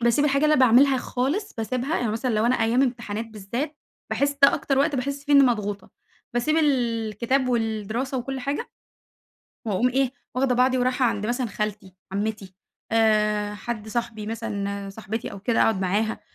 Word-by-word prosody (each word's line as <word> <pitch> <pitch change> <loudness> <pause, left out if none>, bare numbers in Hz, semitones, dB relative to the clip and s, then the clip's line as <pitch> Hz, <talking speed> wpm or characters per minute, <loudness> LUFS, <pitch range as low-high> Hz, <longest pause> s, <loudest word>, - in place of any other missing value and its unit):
باسيب 235 +5 +3
الحاجة 280 0 +2
اللي 305 0 +5
أنا - - +2
باعملها 260 +3 +5
خالص 275 - -2
باسيبها، 250 +6 -2
يعني 225 -3 -1
مثلًا 245 +3 -1
لو 215 +2 +2
أنا 250 - +3
أيام 235 +4 +3
امتحانات 230 -3 -2
بالذات، 230 +8 -5 0.3
باحس 280 0 +1
ده 280 - +8
أكتر 275 -1 0
وقت 285 +1 +2
باحس 280 +2 -3
فيه 290 - 0
إني 280 -1 +8
مضغوطة، 205 -6 0 0.4
باسيب 245 +6 +1
الكتاب 245 - +1
والدراسة 230 +2 -1
وكلّ 265 +2 -4
حاجة، 280 +3 -3 1.0
وأقوم 220 +4 +2
إيه، 260 0 +1 0.2
واخدة 255 0 +2
بعضي 255 +1 +3
ورايحة 255 +1 +1
عند 210 -2 -1
مثلًا 245 +1 -1
خالتي 205 -3 -4 0.2
عمّتي، 200 -1 -3 0.4
آآ 210 -2 +2
حد 220 0 -5
صاحبي 225 -2 -3
مثلًا 200 -3 -4
صاحبتي 220 +2 -5
أو 200 - -8
كده 225 +3 +2
أقعد 220 -4 +2
معاها، 205 +4 0
235 Hz, 165 wpm, -24 LUFS, 215-265 Hz, 1.0 s, ده